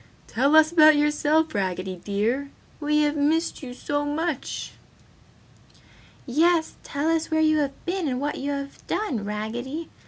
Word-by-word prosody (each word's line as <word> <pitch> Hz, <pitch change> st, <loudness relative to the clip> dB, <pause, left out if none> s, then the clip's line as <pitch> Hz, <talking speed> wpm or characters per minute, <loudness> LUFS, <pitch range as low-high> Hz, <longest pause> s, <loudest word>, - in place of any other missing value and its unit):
"Tell 275 Hz, +6 st, +2 dB
us 315 Hz, 0 st, +6 dB
about 310 Hz, -2 st, +7 dB
yourself, 300 Hz, +2 st, +2 dB
Raggedy 185 Hz, -2 st, -2 dB
dear, 230 Hz, +8 st, -1 dB, 0.3 s
we 300 Hz, 0 st, +2 dB
have 295 Hz, 0 st, +1 dB
missed 310 Hz, +3 st, 0 dB
you 260 Hz, -3 st, -7 dB
so 290 Hz, +2 st, -2 dB
much!" 300 Hz, 0 st, -3 dB, 1.5 s
"Yes! 320 Hz, +5 st, +2 dB
Tell 285 Hz, +2 st, -3 dB
us 325 Hz, -1 st, +1 dB
where 315 Hz, -1 st, +1 dB
you 310 Hz, 0 st, +3 dB
have 275 Hz, -2 st, -3 dB
been 360 Hz, -2 st, -1 dB
and 250 Hz, -2 st, -1 dB
what 290 Hz, +2 st, -3 dB
you 280 Hz, -, -3 dB
have 280 Hz, -1 st, -5 dB
done, 345 Hz, -, -2 dB
Raggedy!" 235 Hz, +9 st, -4 dB
290 Hz, 150 wpm, -25 LUFS, 260-315 Hz, 1.5 s, about